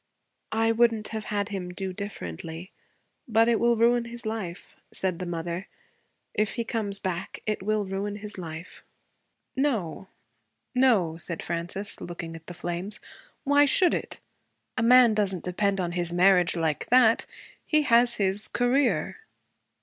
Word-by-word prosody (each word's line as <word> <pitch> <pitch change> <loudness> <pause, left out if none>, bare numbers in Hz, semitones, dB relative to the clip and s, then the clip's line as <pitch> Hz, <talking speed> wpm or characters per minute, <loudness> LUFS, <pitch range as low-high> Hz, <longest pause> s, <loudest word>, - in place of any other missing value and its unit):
'I 225 +1 +2
wouldn't 225 -2 +2
have 220 -1 -5
had 205 0 -2
him 190 -3 -4
do 190 +1 -4
differently. 165 - -7 0.6
But 225 0 +4
it 235 -2 +3
will 235 0 +3
ruin 235 +1 +3
his 235 0 -8
life,' 210 -6 -5 0.2
said 185 -3 +1
the 180 - -4
mother. 170 +2 -4 0.7
'If 210 -1 0
he 235 - -1
comes 215 -3 -2
back, 185 -3 -4
it 215 -2 -1
will 210 +1 0
ruin 195 +2 -3
his 210 0 -7
life.' 165 0 -8 0.7
'No, 225 - -1 0.7
no,' 220 -11 +3
said 170 -1 -3
Frances, 175 +4 -4
looking 170 -1 -6
at 165 0 -12
the 175 - -8
flames. 175 +5 -4 0.4
'Why 285 0 +5
should 350 +5 +4
it? - - -4 0.6
A - - -1
man 240 0 +7
does 205 -3 +1
n't 175 - -8
depend 195 +2 0
on 175 -2 -1
his 175 -1 -2
marriage 180 0 +4
like 160 -3 -1
that. 240 -2 +4 0.4
He 305 -1 +2
has 240 -2 +4
his 200 +1 0
career.' 250 - +1
200 Hz, 150 wpm, -27 LUFS, 175-230 Hz, 0.7 s, man